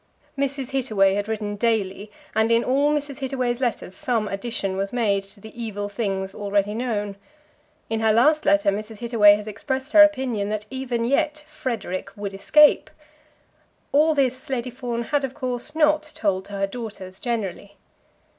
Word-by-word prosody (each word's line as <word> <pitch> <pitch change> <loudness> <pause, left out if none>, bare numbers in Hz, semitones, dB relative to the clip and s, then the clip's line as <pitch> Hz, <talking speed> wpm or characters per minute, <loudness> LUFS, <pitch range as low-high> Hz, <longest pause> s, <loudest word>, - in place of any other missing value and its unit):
Mrs. 275 -1 -2
Hittaway 215 -8 +2
had 205 +1 -2
written 210 -2 -3
daily, 210 -2 -1 0.2
and 220 +1 +2
in 230 +1 +4
all 280 +3 +2
Mrs. 290 -2 -2
Hittaway's 255 -2 -2
letters 230 -6 -2
some 235 -6 -1
addition 200 -1 -3
was 195 +1 -2
made 210 -5 +1
to 195 +1 -15
the 220 +2 -12
evil 210 -3 -4
things 195 -2 -3
already 205 0 0
known. 210 -4 -2 0.7
In 225 - -1
her 220 0 +3
last 300 +8 +4
letter 200 0 +3
Mrs. 215 +2 -5
Hittaway 220 -3 +5
had 210 0 -6
expressed 265 +5 -4
her 310 - +8
opinion 260 -9 +3
that 210 0 -3
even 255 -3 -2
yet 295 +4 0
"Frederic" 220 -10 -4
would 200 -1 -5
escape. 300 +9 +5 1.0
All 305 +3 +4
this 260 -2 0
Lady 250 -1 -2
Fawn 240 -2 -3
had, 285 +4 0
of 265 -1 -4
course, 255 +4 -3
not 305 -1 +4
told 190 -2 0
to 205 - -11
her 195 0 0
daughters 195 -4 -8
generally. 200 -4 -4
230 Hz, 165 wpm, -23 LUFS, 205-265 Hz, 1.0 s, her